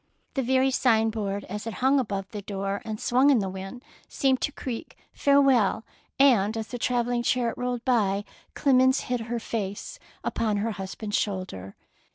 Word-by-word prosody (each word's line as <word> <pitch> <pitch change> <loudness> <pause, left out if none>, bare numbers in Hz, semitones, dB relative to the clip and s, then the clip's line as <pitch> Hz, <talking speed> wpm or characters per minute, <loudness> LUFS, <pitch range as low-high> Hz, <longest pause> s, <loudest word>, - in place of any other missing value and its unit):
The 270 - 0
very 260 +1 +2
sign 225 -4 +3
board 205 -2 -3
as 210 +3 -6
it 225 - -4
hung 265 +6 +3
above 200 -6 -3
the 210 - -5
door 195 0 -3
and 215 -1 -5
swung 255 +4 +3
in 275 - +5
the 200 -3 0
wind 195 +6 -8 0.2
seemed 265 -2 +1
to 295 - 0
creak 250 -4 -6 0.2
'^farewell/' 270 -7 +3 0.3
and 230 -6 +4
as 220 -1 -4
the 245 - -5
travelling 245 0 0
chariot 240 -1 +1
rolled 245 -1 -3
by, 205 -6 +2 0.3
Clemence 260 -1 +4
hid 250 0 -2
her 235 +1 -3
face 220 - -4 0.2
upon 215 -2 0
her 220 +3 -1
husband's 205 +1 -3
shoulder. 185 - -4
230 Hz, 170 wpm, -26 LUFS, 205-255 Hz, 0.3 s, in